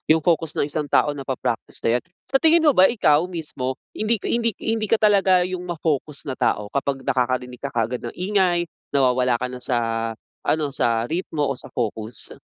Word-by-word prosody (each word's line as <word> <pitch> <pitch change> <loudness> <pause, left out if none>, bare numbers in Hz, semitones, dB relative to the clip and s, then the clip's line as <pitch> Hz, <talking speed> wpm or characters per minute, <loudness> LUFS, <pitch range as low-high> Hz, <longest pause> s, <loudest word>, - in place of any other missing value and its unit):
yung 160 - -2
focus 165 -2 +1
ng - - +1
isang 150 +1 -2
tao 150 - +3
napa-practice 135 -5 -3
na 115 +2 +2
yan. - - -24 0.3
Sa 270 - +4
tingin 325 +1 +5
mo 300 - +6
ba, 190 -7 +6
ikaw 175 -11 +3
mismo, 150 -7 -4 0.2
hindi 215 +2 0
hindi 230 -2 0
hindi 220 -1 0
ka 225 - +4
talaga 195 -4 +4
yung 180 0 -4
ma-focus 155 -4 -2
na 130 -3 -5
tao 105 0 0
kapag 140 -1 -2
nakakarinig 125 -1 -1
ka 140 - -3
kaagad 120 -1 -1
ng 120 - -7
ingay, 180 -2 +1 0.3
nawawala 125 -2 +3
ka 125 +2 -2
na 125 - -7
sa 125 0 0 0.7
ano, 150 -2 0
sa 115 -3 +1
ritmo, 160 -2 -2
o 140 - -1
sa - - -7
focus? 110 -1 -2
145 Hz, 185 wpm, -23 LUFS, 125-185 Hz, 0.7 s, mo